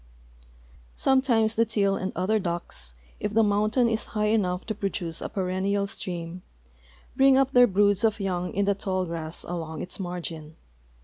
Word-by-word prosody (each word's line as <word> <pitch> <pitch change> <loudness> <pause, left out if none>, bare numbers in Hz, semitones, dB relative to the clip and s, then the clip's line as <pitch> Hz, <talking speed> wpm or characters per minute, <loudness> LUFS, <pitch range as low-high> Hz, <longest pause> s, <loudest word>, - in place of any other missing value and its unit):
Sometimes 250 -5 +3
the 230 - +3
teal 200 -3 +1
and 190 0 -3
other 195 +5 +1
ducks, 170 - -4 0.2
if 210 +1 -3
the 225 - +5
mountain 215 +4 +2
is 225 -1 -1
high 210 0 +2
enough 185 -4 0
to 220 - -2
ju'oduce 190 -5 -3
a - - -4
perennial 195 +1 -1
stream, 175 -2 -5 0.7
bring 270 0 +5
up 270 0 +2
their 245 -1 +6
broods 205 0 +2
of 220 -1 +2
young 180 -2 -2
in 200 +1 0
the 200 - +3
tall 190 -2 -2
grass 165 -1 -2
along 165 -2 -5
its 180 - -5
margin. 170 -4 -6
195 Hz, 165 wpm, -26 LUFS, 180-220 Hz, 0.7 s, their